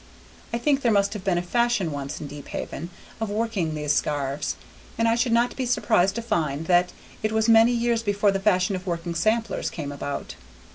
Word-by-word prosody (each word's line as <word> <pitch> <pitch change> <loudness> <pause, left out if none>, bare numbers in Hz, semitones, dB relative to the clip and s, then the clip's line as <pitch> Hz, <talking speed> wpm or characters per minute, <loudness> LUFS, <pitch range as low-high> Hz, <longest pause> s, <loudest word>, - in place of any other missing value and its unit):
I 235 - 0
think 275 +3 +1
there 235 - +3
must 200 -1 +2
have 210 -3 -6
been 185 -2 +1
a 175 - -1
fashion 235 -3 +1
once, 140 0 -5
in - - -6
Deephaven, 145 +3 -6 0.3
of 220 -2 -2
working 205 -7 -1
these 150 -1 0
scarfs, 145 -1 -1 0.4
and 230 - +2
I 230 - +4
should 240 +1 +1
not 235 +1 +2
be 265 - -2
surprised 200 -5 +2
to 235 - -3
find 155 -8 -1
that 180 +1 +3 0.3
it 215 - 0
was 220 0 +1
many 225 +1 +6
years 235 -1 +1
before 205 -2 +2
the 195 - -1
fashion 190 -1 +2
of 185 +1 -7
working 170 0 -2
samplers 220 +7 0
came 145 -4 -5
about. 140 0 -5
200 Hz, 200 wpm, -25 LUFS, 165-230 Hz, 0.4 s, many